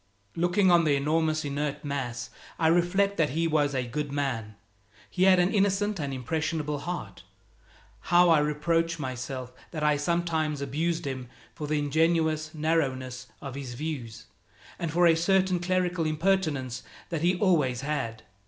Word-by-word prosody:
Looking 180 +3 +3
on 170 -1 +5
the 150 -3 +3
enormous 155 +2 +1
inert 145 +1 -3
mass, 125 -4 -4 0.3
I 160 - +3
reflect 190 +4 +2
that 155 -3 +2
he 165 0 +2
was 145 -3 +1
a 130 -1 0
good 145 +4 -4
man. 125 -7 -2 0.6
He 185 0 +2
had 190 -1 +6
an 180 +1 +2
innocent 200 0 +1
and 140 -2 -2
impressionable 150 +3 -2
heart. 175 +4 -6 0.9
How 175 0 +6
I 160 - +6
reproach 165 +3 0
myself 130 -2 -5 0.2
that 155 -3 -5
I 150 -1 +3
sometimes 160 -1 0
abused 160 +4 -1
him 130 -3 -5 0.2
for 150 -2 -6
the 155 +1 0
ingenuous 155 +1 +1
narrowness 130 -5 -1 0.2
of 135 -2 -6
his 135 -3 -6
views, 130 -6 -5 0.5
and 165 -2 -2
for 175 +2 +3
a 170 - +7
certain 185 +2 +2
clerical 180 -2 0
impertinence 155 -7 0 0.3
that 165 -3 -2
he 175 +2 +3
always 150 - +2
had! 135 -7 -3
155 Hz, 155 wpm, -27 LUFS, 140-170 Hz, 0.9 s, a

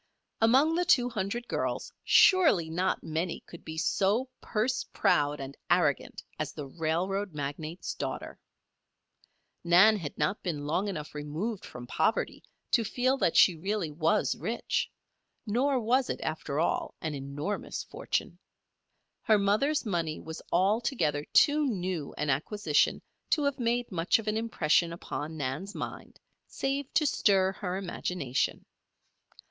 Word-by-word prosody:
Among 265 +8 +5
the 350 +2 +2
two 250 -8 +4
hundred 230 +3 -3
girls, - - -2
surely 310 - +5
not 180 +3 0
many 165 +2 -2
could 170 - -13
be 160 0 -7
so 200 +8 +1
purse 245 +4 -1
proud 145 0 +2
and 135 0 -7
arrogant - - +1 0.2
as - - -3
the 145 - -6
railroad 175 +5 -2
magnate's 150 +4 -4
daughter. - - -5 1.2
Nan 180 +6 +6
had 160 -7 -6
not 150 +8 0
been 150 -5 -3
long 175 +7 0
enough 155 -7 -5
removed 155 +9 -4
from 125 0 -9
poverty 160 - 0 0.3
to 230 - +4
feel 250 +5 +1
that 170 - +1
she 185 - +7
really 190 0 -2
was 155 -3 +1
rich, 220 +9 -2 0.6
nor 255 +5 +1
was 250 +3 +2
it, - - -2
after 155 -2 -3
all, 165 - 0
an 160 -2 -3
enormous 145 +8 -4
fortune. - - -3 0.8
Her 215 - +4
mother's 215 +10 +1
money 170 -6 -1
was 160 0 -8
altogether 190 - +1
too 295 0 +4
new 180 - -2
an 150 -1 0
acquisition 155 +2 +1 0.3
to 300 - +2
have 280 -1 0
made 240 0 0
much 170 -1 +2
of 225 -1 -7
an 215 - +1
impression 175 -7 +2
upon 155 -1 -5
Nan's 150 +9 -4
mind, - - -7 0.3
save 275 0 -2
to 310 - +4
stir 195 -8 +3
her 190 -1 -4
imagination. 175 -7 -2
185 Hz, 140 wpm, -29 LUFS, 155-225 Hz, 1.2 s, she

